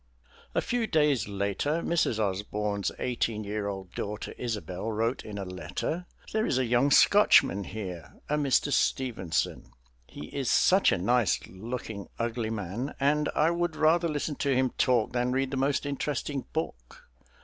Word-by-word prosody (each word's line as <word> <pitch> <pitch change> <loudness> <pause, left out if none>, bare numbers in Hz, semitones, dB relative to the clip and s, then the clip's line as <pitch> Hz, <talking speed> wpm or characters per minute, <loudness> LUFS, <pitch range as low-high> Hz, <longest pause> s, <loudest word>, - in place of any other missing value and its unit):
A - - +3
few 240 -2 -1
days 150 - +2
later 100 - -1
Mrs. 165 -9 +1
Osbourne's 100 0 -1
eighteen 115 -3 -1
year 105 0 -3
old 95 -2 -5
daughter 105 +1 -5
Isobel 110 -3 -4
wrote 115 +4 -1
in 105 -1 -7
a 100 - -4
letter: 90 - -4 0.3
"There 220 0 +1
is 130 - +1
a 130 - +2
young 120 +4 +3
Scotchman 140 - +5
here, 95 -6 -7
a 150 - +1
Mr. 145 -1 +2
Stevenson. 115 -10 0 0.4
He 75 - -9
is 135 -3 -2
such 190 +2 +5
a - - +2
nice 120 +5 +2
looking 110 0 -6
ugly 115 -1 -2
man, 110 +5 -4
and 145 +2 +2
I 155 +2 +3
would 170 -1 -1
rather 165 +2 +3
listen 150 0 -2
to 140 -2 +1
him 130 -1 +2
talk 125 -4 +1
than 125 0 0
read 135 0 0
the 135 - -2
most 140 +2 +1
interesting 140 -1 -2
book.... - - -5
125 Hz, 160 wpm, -28 LUFS, 105-145 Hz, 0.4 s, Scotchman